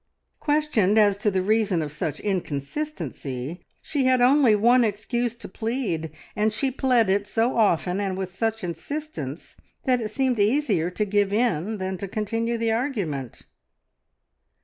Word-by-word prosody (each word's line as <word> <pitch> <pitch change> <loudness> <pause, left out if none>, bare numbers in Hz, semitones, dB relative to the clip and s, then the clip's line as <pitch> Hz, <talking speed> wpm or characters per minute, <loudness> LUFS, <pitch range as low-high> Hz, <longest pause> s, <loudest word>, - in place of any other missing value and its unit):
Questioned 290 -10 +2
as 205 -2 +5
to 210 +1 +1
the 190 -2 0
reason 210 -5 +2
of 150 - -5
such 150 0 -3
inconsistency, 165 - -4 0.2
she 285 -4 -1
had 255 0 +4
only 250 -2 +5
one 240 +4 +5
excuse 230 +2 -1
to 235 - -10
plead, 220 -7 -2 0.3
and 215 0 +2
she 265 +5 -1
pled 250 -4 +2
it 200 +2 +1
so 225 +4 +1
often 190 -4 +2
and 195 -2 -2
with 190 -1 -5
such 225 +1 -1
insistence 170 - -5 0.3
that 250 -3 +2
it 215 - -3
seemed 255 0 0
easier 205 - +2
to 210 +4 -1
give 205 0 +1
in 215 -2 0
than 190 -1 -3
to 200 - -4
continue 225 +3 -1
the 225 0 0
argument. 200 - -2
215 Hz, 150 wpm, -25 LUFS, 185-245 Hz, 0.3 s, as